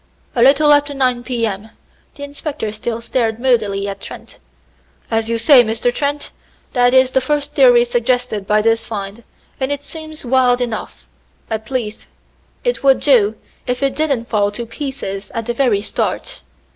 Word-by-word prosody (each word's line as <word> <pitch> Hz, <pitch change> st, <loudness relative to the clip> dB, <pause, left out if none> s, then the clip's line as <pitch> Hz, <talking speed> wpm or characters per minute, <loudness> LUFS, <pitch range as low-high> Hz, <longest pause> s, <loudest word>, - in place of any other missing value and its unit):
"A 240 Hz, -, 0 dB
little 290 Hz, +4 st, +6 dB
after 290 Hz, 0 st, +2 dB
nine 255 Hz, -2 st, +1 dB
P. 240 Hz, -2 st, -2 dB
M." 210 Hz, 0 st, -4 dB, 0.5 s
The 285 Hz, -, -9 dB
inspector 285 Hz, -5 st, -5 dB
still 225 Hz, +2 st, -4 dB
stared 230 Hz, -2 st, -1 dB
moodily 215 Hz, -6 st, +1 dB
at 195 Hz, 0 st, -6 dB
Trent. -, -, -11 dB, 0.7 s
"As 225 Hz, 0 st, 0 dB
you 230 Hz, -, 0 dB
say, 255 Hz, +1 st, +6 dB
Mr. 230 Hz, +2 st, 0 dB
Trent, 285 Hz, +2 st, -2 dB, 0.4 s
that 245 Hz, 0 st, +3 dB
is 260 Hz, 0 st, +5 dB
the 265 Hz, -, +2 dB
first 295 Hz, +2 st, -1 dB
theory 245 Hz, -4 st, +6 dB
suggested 240 Hz, -4 st, -1 dB
by 210 Hz, 0 st, +3 dB
this 225 Hz, 0 st, +1 dB
find, 205 Hz, 0 st, -6 dB, 0.4 s
and 265 Hz, +1 st, -1 dB
it 285 Hz, 0 st, -3 dB
seems 315 Hz, -1 st, -9 dB
wild 250 Hz, 0 st, +3 dB
enough 235 Hz, -3 st, -5 dB, 0.4 s
at 220 Hz, -1 st, -4 dB
least 225 Hz, -5 st, -4 dB, 0.6 s
it -, -, -1 dB
would 270 Hz, -1 st, +4 dB
do, 225 Hz, -7 st, +3 dB, 0.3 s
if 250 Hz, +2 st, -1 dB
it 270 Hz, -1 st, +1 dB
didn't 275 Hz, -6 st, 0 dB
fall 205 Hz, -2 st, +1 dB
to 235 Hz, +3 st, -5 dB
pieces 230 Hz, -6 st, -6 dB
at 230 Hz, -1 st, -2 dB
the 240 Hz, -, -2 dB
very 235 Hz, -5 st, +1 dB
start. -, -, -3 dB
245 Hz, 170 wpm, -18 LUFS, 225-275 Hz, 0.7 s, little